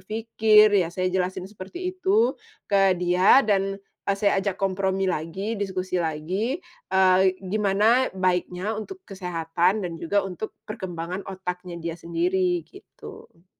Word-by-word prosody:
berpikir." 215 Hz, 0 st, +4 dB
Iya 170 Hz, -, 0 dB
saya 185 Hz, 0 st, 0 dB
jelasin 185 Hz, 0 st, -1 dB
seperti 200 Hz, -, -9 dB
itu 390 Hz, +5 st, +2 dB, 0.3 s
ke 195 Hz, -1 st, +4 dB
dia 180 Hz, +8 st, +5 dB
dan, 195 Hz, -1 st, +1 dB
eee, 200 Hz, 0 st, -4 dB
saya 200 Hz, -1 st, +2 dB
ajak 195 Hz, -2 st, -2 dB
kompromi 190 Hz, 0 st, 0 dB
lagi, 185 Hz, +7 st, -3 dB
diskusi 185 Hz, -2 st, -2 dB
lagi, 185 Hz, -, -2 dB, 0.3 s
eee, 190 Hz, 0 st, +4 dB
gimana 210 Hz, +5 st, +2 dB
baiknya 185 Hz, +2 st, -1 dB
untuk 365 Hz, -, -7 dB
kesehatan 180 Hz, +1 st, -1 dB
dan 170 Hz, -, -7 dB
juga 200 Hz, +5 st, +2 dB
untuk 195 Hz, +4 st, -6 dB, 0.2 s
perkembangan 180 Hz, -2 st, -5 dB
otaknya 180 Hz, -2 st, -6 dB
dia 165 Hz, 0 st, -4 dB
sendiri 175 Hz, +2 st, 0 dB
gitu. 190 Hz, -, -14 dB
190 Hz, 130 wpm, -25 LUFS, 180-205 Hz, 0.3 s, dia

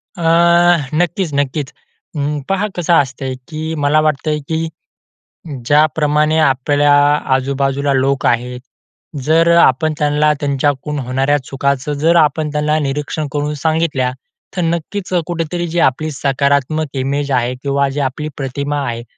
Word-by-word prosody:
अ, 175 Hz, -, -8 dB, 0.8 s
नक्कीच, 175 Hz, +1 st, 0 dB
नक्कीच. 140 Hz, 0 st, -1 dB, 0.5 s
अं, 145 Hz, +1 st, -1 dB
पहा 195 Hz, +2 st, 0 dB
कसं 175 Hz, -1 st, 0 dB
असतंय, 135 Hz, -3 st, 0 dB
की 160 Hz, 0 st, -5 dB
मला 145 Hz, 0 st, +2 dB
वाटतंय, 155 Hz, 0 st, 0 dB
की 160 Hz, 0 st, -1 dB, 1.0 s
ज्याप्रमाणे 150 Hz, +1 st, +2 dB
आपल्या 145 Hz, 0 st, +2 dB, 0.4 s
आजूबाजूला 135 Hz, +1 st, 0 dB
लोक 135 Hz, +1 st, +1 dB
आहेत. 125 Hz, +1 st, 0 dB, 0.6 s
जर 165 Hz, +3 st, +3 dB
अ, -, -, +6 dB
आपण 155 Hz, +4 st, +3 dB
त्यांना 150 Hz, +1 st, +2 dB
त्यांच्याकडून 145 Hz, +1 st, -1 dB
होणाऱ्या 135 Hz, +3 st, 0 dB
चुकाचं 140 Hz, +1 st, -2 dB
जर 165 Hz, +2 st, +4 dB
आपण 155 Hz, -1 st, +2 dB
त्यांना 150 Hz, +1 st, +1 dB
निरीक्षण 150 Hz, +1 st, -3 dB
करून 150 Hz, 0 st, -2 dB
सांगितल्या, 155 Hz, -5 st, +1 dB, 0.5 s
तर -, -, 0 dB
नक्कीच 170 Hz, +4 st, -3 dB
कुठेतरी 175 Hz, 0 st, -3 dB
जी 170 Hz, +2 st, -3 dB
आपली 155 Hz, +4 st, +1 dB
सकारात्मक 140 Hz, +2 st, 0 dB
इमेज 140 Hz, +2 st, -1 dB
आहे 125 Hz, -1 st, 0 dB
किंवा 140 Hz, 0 st, +1 dB
जी 135 Hz, +2 st, -4 dB
आपली 140 Hz, +3 st, -2 dB
प्रतिमा 140 Hz, +2 st, -3 dB
आहे, 115 Hz, -1 st, -4 dB
145 Hz, 130 wpm, -16 LUFS, 135-155 Hz, 1.0 s, अ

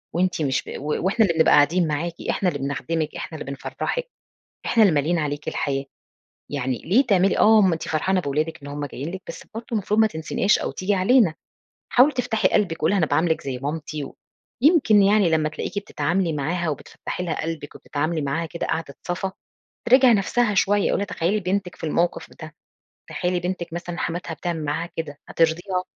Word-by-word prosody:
وأنتِ 180 Hz, -1 st, +1 dB
مش 135 Hz, -3 st, 0 dB
ب -, -, -6 dB
وإحنا 185 Hz, -, +1 dB
اللي 170 Hz, -4 st, -1 dB
بنبقى 160 Hz, -, +5 dB
قاعدين 160 Hz, +4 st, +4 dB
معاكِ، 160 Hz, +3 st, -2 dB, 0.2 s
إحنا 185 Hz, -, +1 dB
اللي 145 Hz, -, -4 dB
بنخدمِك، 150 Hz, +3 st, -2 dB
إحنا 160 Hz, -, -6 dB
اللي 140 Hz, -, -6 dB
بنفرّحِك، -, -, -4 dB, 0.6 s
إحنا 230 Hz, -, +4 dB
اللي 195 Hz, -6 st, +5 dB
ماليين 155 Hz, +4 st, +1 dB
عليكِ 145 Hz, -1 st, -3 dB
الحياة. 135 Hz, -1 st, -1 dB, 0.7 s
يعني 130 Hz, -3 st, -2 dB
ليه 230 Hz, -, +3 dB
تعملي 195 Hz, -3 st, +3 dB
آه 220 Hz, 0 st, +6 dB
ما 190 Hz, -4 st, +4 dB
أنتِ 160 Hz, -, -6 dB
فرحانة 185 Hz, +4 st, +1 dB
بولادِك 155 Hz, +1 st, -2 dB
إن 145 Hz, -, -8 dB
هُم 145 Hz, 0 st, -4 dB
جايين 140 Hz, +3 st, -6 dB
لِك، 190 Hz, +2 st, -7 dB
بس -, -, -8 dB
برضه 230 Hz, +1 st, -4 dB
مفروض 210 Hz, +1 st, +1 dB
ما 220 Hz, -, +6 dB
تنسيناش 160 Hz, +2 st, +1 dB
أو -, -, -3 dB
تيجي 195 Hz, +2 st, -1 dB
علينا، 195 Hz, -2 st, +4 dB, 0.6 s
حاولي 265 Hz, +4 st, +5 dB
تفتحي 245 Hz, -4 st, +1 dB
قلبِك، 175 Hz, -6 st, +1 dB
قولي 155 Hz, -, +1 dB
لها -, -, +2 dB
أنا 175 Hz, -, +3 dB
باعاملِك 160 Hz, +1 st, +1 dB
زي 135 Hz, -2 st, -4 dB
مامتي، 150 Hz, +1 st, -4 dB, 0.5 s
يمكن 280 Hz, -, +5 dB
يعني 200 Hz, -2 st, +4 dB
لمّا 155 Hz, -1 st, +2 dB
تلاقيكِ 155 Hz, +5 st, -4 dB
بتتعاملي 185 Hz, -4 st, -1 dB
معاها 165 Hz, +4 st, -1 dB
وبتفتّحي 155 Hz, +4 st, -5 dB
لها 170 Hz, -, -2 dB
قلبِك 160 Hz, -2 st, -5 dB
وبتتعاملي 155 Hz, +2 st, -2 dB
معاها 145 Hz, +4 st, -1 dB
كده 170 Hz, +1 st, -5 dB
قعدة 160 Hz, -3 st, -3 dB
صَفا، 185 Hz, +2 st, -2 dB, 0.6 s
تراجِع 255 Hz, 0 st, +7 dB
نَفْسها 225 Hz, +2 st, +2 dB
شوية، 205 Hz, +2 st, +3 dB
قولي -, -, +1 dB
لها، 200 Hz, -, -1 dB
تخيلي 195 Hz, +3 st, 0 dB
بنتِك 185 Hz, -1 st, -2 dB
في -, -, -16 dB
الموقف 170 Hz, +2 st, 0 dB
ده، 155 Hz, 0 st, -9 dB, 0.6 s
تخيلي 180 Hz, 0 st, -1 dB
بنتِك 180 Hz, -1 st, -4 dB
مثلًا 175 Hz, 0 st, -5 dB
حماتها 170 Hz, -1 st, -3 dB
بتعمل 165 Hz, -2 st, -4 dB
معاها 160 Hz, +4 st, -2 dB
كده، 145 Hz, -3 st, -5 dB
هترضيها؟ 175 Hz, +3 st, 0 dB
170 Hz, 185 wpm, -23 LUFS, 155-195 Hz, 0.7 s, تراجِع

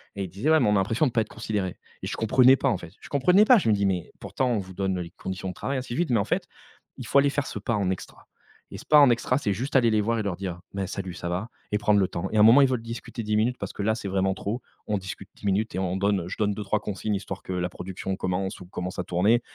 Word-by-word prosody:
Et 100 Hz, -, -3 dB
ils 95 Hz, -, -5 dB
disaient: 100 Hz, -, -2 dB
«Ouais, 160 Hz, -, +6 dB
mais 125 Hz, -, +2 dB
on -, -, +3 dB
a -, -, +3 dB
l'impression 110 Hz, +9 st, +2 dB
de -, -, -2 dB
pas 115 Hz, -, +2 dB
être 110 Hz, -, -5 dB
considérés». 105 Hz, -4 st, -3 dB, 0.3 s
Et -, -, -3 dB
je -, -, -3 dB
comprenais 130 Hz, +4 st, +5 dB
pas, -, -, +1 dB
en 105 Hz, -, +1 dB
fait. 85 Hz, -2 st, -11 dB
Je -, -, -12 dB
comprenais 180 Hz, +9 st, +4 dB
pas! 250 Hz, +2 st, +7 dB
Je 180 Hz, -, +1 dB
me -, -, +5 dB
dis: 100 Hz, -1 st, +1 dB
«Mais 90 Hz, -3 st, -1 dB
pourtant, 130 Hz, -1 st, -1 dB
on 115 Hz, -, +1 dB
vous 95 Hz, -1 st, -8 dB
donne 95 Hz, 0 st, -1 dB
les 85 Hz, -1 st, -6 dB
conditions 95 Hz, 0 st, -5 dB
de -, -, -5 dB
travail 135 Hz, +7 st, -3 dB
ainsi 125 Hz, -2 st, -5 dB
de -, -, -3 dB
suite,» 175 Hz, -3 st, 0 dB
mais 115 Hz, -, +3 dB
en 100 Hz, -, 0 dB
fait, -, -, -1 dB, 0.5 s
il -, -, -7 dB
faut 140 Hz, -, +5 dB
aller 140 Hz, 0 st, +4 dB
faire 140 Hz, 0 st, -2 dB
ce -, -, -5 dB
pas 110 Hz, +3 st, -1 dB
en 100 Hz, -3 st, 0 dB
extra. 95 Hz, -, -6 dB, 0.4 s
Et -, -, -8 dB
ce -, -, -11 dB
pas 150 Hz, -, +6 dB
en 140 Hz, -3 st, +7 dB
extra, 120 Hz, +1 st, +1 dB
c'est 105 Hz, -8 st, 0 dB
juste 130 Hz, +8 st, 0 dB
aller 120 Hz, -3 st, +4 dB
les 110 Hz, -1 st, +3 dB
voir 115 Hz, +2 st, 0 dB
et -, -, -1 dB
leur 100 Hz, -3 st, -2 dB
dire: 90 Hz, -2 st, -5 dB
«Beh, 95 Hz, -1 st, -2 dB
salut, 95 Hz, -1 st, -5 dB
ça 85 Hz, 0 st, -5 dB
va?». 95 Hz, +6 st, -3 dB, 0.2 s
Et 105 Hz, -, +2 dB
prendre 105 Hz, 0 st, +3 dB
le 95 Hz, -, +2 dB
temps. 90 Hz, +2 st, -4 dB
Et 110 Hz, -, 0 dB
à -, -, +6 dB
un -, -, +8 dB
moment, 115 Hz, +5 st, +8 dB
ils 135 Hz, -, +6 dB
veulent 125 Hz, -3 st, -1 dB
discuter 115 Hz, 0 st, -6 dB
10 105 Hz, 0 st, 0 dB
minutes, 120 Hz, +4 st, +2 dB
parce -, -, -4 dB
que -, -, -5 dB
là, 110 Hz, +1 st, +2 dB
c'est 100 Hz, -3 st, -5 dB
vraiment 95 Hz, 0 st, +1 dB
trop? 105 Hz, +6 st, -4 dB, 0.3 s
On 105 Hz, -, 0 dB
discute 95 Hz, 0 st, -8 dB
10 -, -, -12 dB
minutes 100 Hz, +3 st, 0 dB
et -, -, -1 dB
on 95 Hz, -1 st, -1 dB
donne, 100 Hz, -3 st, 0 dB
je 90 Hz, -, -5 dB
donne 105 Hz, -2 st, +1 dB
2-3 105 Hz, +1 st, -1 dB
consignes, 105 Hz, +1 st, -2 dB
histoire 100 Hz, -, -6 dB
que 95 Hz, -, -5 dB
la 90 Hz, 0 st, -1 dB
production 95 Hz, +1 st, -5 dB
commence 95 Hz, +1 st, -2 dB
ou 90 Hz, -, -10 dB
commence 90 Hz, 0 st, -5 dB
à -, -, 0 dB
tourner, 100 Hz, +8 st, +3 dB
105 Hz, 315 wpm, -26 LUFS, 95-115 Hz, 0.5 s, un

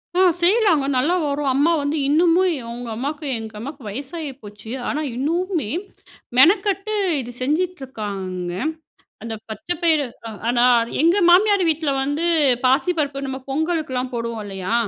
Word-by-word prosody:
ஆ. -, -, +2 dB, 0.2 s
செய்யலாங்க 365 Hz, -6 st, +4 dB
நல்லா 305 Hz, +8 st, +2 dB
வரும். 285 Hz, -1 st, -1 dB
அம்மா 300 Hz, +5 st, +3 dB
வந்து 285 Hz, +2 st, -1 dB
இன்னுமும், 345 Hz, +4 st, +4 dB
ஏ -, -, -6 dB
உங்க 240 Hz, -1 st, -6 dB
அம்மாக்கு, 290 Hz, +5 st, -4 dB
எங்க 220 Hz, -1 st, -8 dB
அம்மாக்கு 275 Hz, +4 st, -7 dB
வயசாகி 285 Hz, -, -5 dB
போச்சு, 210 Hz, +2 st, -10 dB, 0.2 s
ஆனா 300 Hz, -, -1 dB
இன்னும்மே 330 Hz, -, -1 dB, 0.7 s
மெனக்கட்டு 395 Hz, +6 st, +4 dB, 0.3 s
இது 245 Hz, 0 st, -8 dB
செஞ்சுட்ருக்காங்க. 220 Hz, -, -3 dB, 0.7 s
அந்த 225 Hz, -1 st, -5 dB
பச்சை 315 Hz, +10 st, -4 dB
பயறு, 310 Hz, -5 st, +3 dB, 0.2 s
அ -, -, -5 dB, 0.2 s
ஆனா 240 Hz, 0 st, +3 dB, 0.4 s
எங்க 340 Hz, +4 st, +4 dB
மாமியார் 400 Hz, +1 st, +5 dB
வீட்ல 310 Hz, -2 st, 0 dB
வந்து 290 Hz, +4 st, -1 dB, 0.4 s
பாசிப்பருப்பு, 280 Hz, 0 st, +1 dB
நம்ம 265 Hz, 0 st, -4 dB
பொங்கலுக்கெல்லாம் 275 Hz, -4 st, -1 dB
போடுவோம் 230 Hz, -2 st, -3 dB
இல்லையா, 195 Hz, +2 st, -3 dB
285 Hz, 135 wpm, -21 LUFS, 245-340 Hz, 0.7 s, மாமியார்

